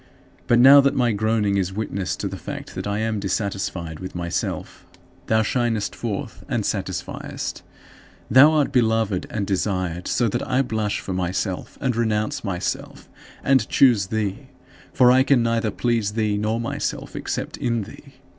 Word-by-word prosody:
But 120 - +4
now 135 +3 +9
that 140 0 +1
my 120 -2 +2
groaning 105 -1 +1
is 95 -1 -1
witness 100 -3 -3
to - - -4
the - - -5
fact - - -7
that - - -5
I 100 0 -1
am 110 -1 -1
dissatisfied 95 -5 -3
with 95 - -8
myself, 85 -1 -4 0.4
thou 110 0 +3
shinest 115 -2 -1
forth 110 -4 -5
and - - 0
satisfiest. - - -4 0.7
Thou 135 +6 +7
art 150 -3 +2
beloved 110 -6 +1
and 105 -2 -2
desired; 90 -3 -2
so 120 - +1
that 105 - -1
I 130 +1 +2
blush 110 -4 -2
for 95 - -5
myself, 90 +1 -3
and 130 -3 0
renounce 110 -2 -1
myself 95 -4 -4 0.3
and 130 -5 +3
choose 120 -8 +4
thee, 105 -2 -3 0.4
for 125 -1 +5
I 130 +1 +5
can 130 -3 +3
neither 115 -1 +1
please 115 -1 0
thee 110 -2 0
nor 110 +2 -1
myself 115 - -4
except - - -4
in 115 -3 -1
thee. - - -14
110 Hz, 160 wpm, -23 LUFS, 100-120 Hz, 0.7 s, now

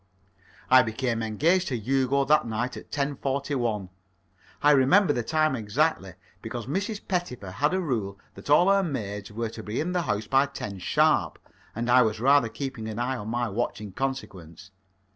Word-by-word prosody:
I 130 0 +9
became 115 0 -2
engaged 165 - +1
to 130 - -1
Hugo 135 +4 +1
that 150 -2 +3
night 120 +3 -2
at - - -10
10.41. 135 -7 -2 0.7
I 145 - +6
remember 145 +5 +4
the 120 - -1
time 155 +4 +1
exactly, 105 -4 -1 0.3
because 120 -2 -6
Mrs. 200 - -3
Pettifer 150 - -3
had 145 - 0
a - - +1
rule 110 - -2 0.2
that - - -12
all 175 +6 +5
her 200 0 +4
maids 105 - -4
were 115 +1 -3
to 110 - -9
be 110 +2 -4
in 165 +4 -1
the 180 -1 0
house 105 -8 -2
by 135 +4 +3
ten 100 -7 -7
sharp, - - +2 0.4
and 115 +2 -3
I 125 +1 +6
was 110 -3 0
rather 135 -1 +4
keeping 125 -4 -5
an 110 -1 -5
eye 125 +2 -1
on 105 -2 -7
my 120 +1 -1
watch 110 +2 -2
in 105 -2 -8
consequence. 95 -8 -6
125 Hz, 180 wpm, -26 LUFS, 110-145 Hz, 0.7 s, I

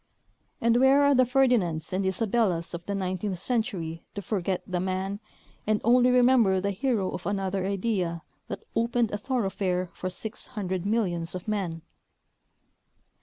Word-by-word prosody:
And 230 0 +3
Avhere 265 +3 +5
are 285 0 +5
the 255 -2 +4
Ferdinands 230 - +2
and 190 +1 0
Isabellas 190 -3 0
of 170 0 -5
the 200 - -1
nineteeeth 185 0 -2
century 180 -8 -2
to 200 - -4
forget 190 -1 -1
the 185 -1 -2
man 190 +2 -2 0.5
and 215 -1 +2
only 245 +2 +5
remember 245 -6 +5
the 200 +2 -1
hero 205 -2 0
of - - -5
another 195 -1 -1
idea 185 -4 -1 0.2
that - - -6
opened 230 0 +1
a 205 - -3
thoroughfare 195 -8 -1
for 185 - -4
six 215 +5 -7
hundred 185 -2 -2
millions 180 -6 -1
of 180 - -7
men? 180 -6 -2
200 Hz, 150 wpm, -27 LUFS, 185-230 Hz, 0.5 s, Avhere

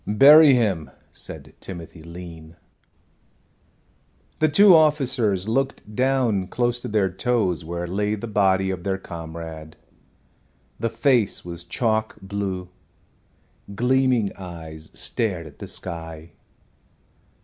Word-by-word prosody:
"Bury 140 +6 +8
him," 100 -10 0 0.2
said - - -9
Timothy 85 -3 -9
Lean. 85 -1 -10 1.8
The 155 - +3
two 200 +6 +7
officers 130 - +2
looked 130 -2 -2
down 125 -7 +1
close 120 +3 -1
to - - -5
their 100 -3 +1
toes 95 -4 0
where 85 +2 -4
lay 105 +4 -1
the 110 - -6
body 95 -2 +2
of 90 -2 -5
their 95 0 -1
comrade. 80 -3 -8 1.0
The 115 +2 0
face 115 -3 +1
was 85 0 -7
chalk 110 +2 -1
blue; 95 -2 -4 1.1
gleaming 125 -2 +2
eyes 80 -4 -9
stared 95 -8 -2
at 75 - -14
the - - -7
sky. 80 -2 -7
100 Hz, 110 wpm, -23 LUFS, 85-120 Hz, 1.8 s, Bury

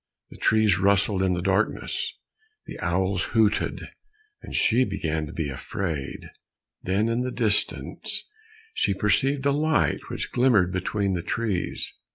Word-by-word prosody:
The - - -11
trees 110 -4 +3
rustled 100 0 +3
in 95 -1 +2
the 85 - -3
darkness, 95 +3 -1 0.5
the - - -9
owls 95 +2 0 0.2
hooted, 105 -2 +1 0.5
and - - -8
she 120 +3 +4
began 80 -8 -2
to - - -8
be 80 -3 -3
afraid. 70 +1 -5 0.5
Then 100 +4 +1
in 115 +1 0
the 125 - -1
distance 110 -5 0 0.5
she 100 - +1
perceived 135 +8 +1
a 140 - +4
light 150 +2 +1
which - - -4
glimmered 115 -8 +3
between 95 +2 -1
the 90 - -1
trees. 105 -1 -2
100 Hz, 140 wpm, -25 LUFS, 90-115 Hz, 0.5 s, she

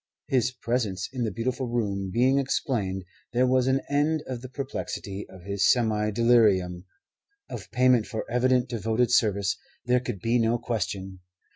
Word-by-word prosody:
His 125 -2 +2
presence 115 -6 -2
in 125 -3 -1
the 110 - -2
beautiful 125 +5 -2
room 100 -5 -2
being 130 +6 +3
explained, 105 -8 -1 0.3
there 125 +2 +3
was 130 0 +2
an 135 +1 +2
end 150 +2 +1
of 125 -2 -5
the 130 - -8
perplexity 125 -7 -5
of 95 -2 -13
his 100 +1 +1
semi 110 -3 +1
delirium. 100 -6 +3 0.7
Of - - -7
payment 125 -3 +3
for 110 -3 -4
evident 125 +1 +2
devoted 115 +1 0
service 100 -5 +2 0.3
there 125 +1 +3
could 120 -5 -5
be 115 +5 +1
no 115 +1 +2
question. 95 -5 -4
120 Hz, 155 wpm, -26 LUFS, 100-125 Hz, 0.7 s, being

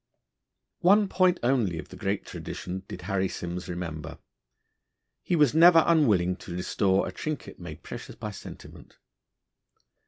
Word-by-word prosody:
One 200 +3 +5
point 185 -1 +2
only 120 -9 +1
of - - -8
the - - -11
great 100 +1 -2
tradition 90 +1 -6
did 90 - -8
Harry 95 0 0
Simms 90 +1 -5
remember. 80 -3 -5 1.0
He 175 - 0
was 150 -6 +4
never 165 0 +7
unwilling 105 - +3
to 85 - -8
restore 95 +1 +1
a - - -5
trinket 155 -2 -6
made - - -9
precious - - -8
by 105 -1 -6
sentiment. 100 - -12
100 Hz, 135 wpm, -27 LUFS, -, 1.0 s, never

